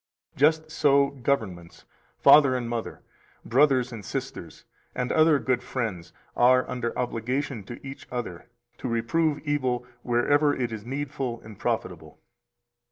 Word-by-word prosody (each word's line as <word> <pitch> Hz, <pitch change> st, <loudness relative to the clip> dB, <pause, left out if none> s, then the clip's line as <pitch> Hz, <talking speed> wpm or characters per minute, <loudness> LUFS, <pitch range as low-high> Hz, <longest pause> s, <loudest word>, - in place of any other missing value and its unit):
Just 155 Hz, +2 st, +2 dB
so 140 Hz, -3 st, +3 dB
governments, 110 Hz, -11 st, -3 dB, 0.3 s
father 140 Hz, -3 st, +6 dB
and 125 Hz, -2 st, -2 dB
mother, 115 Hz, -1 st, -5 dB, 0.4 s
brothers 130 Hz, -1 st, +3 dB
and 110 Hz, -3 st, -8 dB
sisters, -, -, -6 dB, 0.3 s
and 125 Hz, 0 st, -2 dB
other 155 Hz, -1 st, +5 dB
good 130 Hz, -2 st, 0 dB
friends, 110 Hz, -10 st, -4 dB, 0.2 s
are 125 Hz, +1 st, +4 dB
under 120 Hz, -2 st, -3 dB
obligation 125 Hz, +1 st, -2 dB
to 120 Hz, +4 st, -8 dB
each 135 Hz, -, -9 dB
other 120 Hz, -9 st, -5 dB, 0.3 s
to -, -, -4 dB
reprove 145 Hz, +7 st, 0 dB
evil 130 Hz, -5 st, -1 dB, 0.2 s
wherever 145 Hz, +5 st, +2 dB
it 120 Hz, -2 st, -2 dB
is 110 Hz, 0 st, -7 dB
needful 135 Hz, -3 st, -3 dB
and 110 Hz, -2 st, -13 dB
profitable. -, -, -3 dB
125 Hz, 130 wpm, -26 LUFS, 115-140 Hz, 0.4 s, father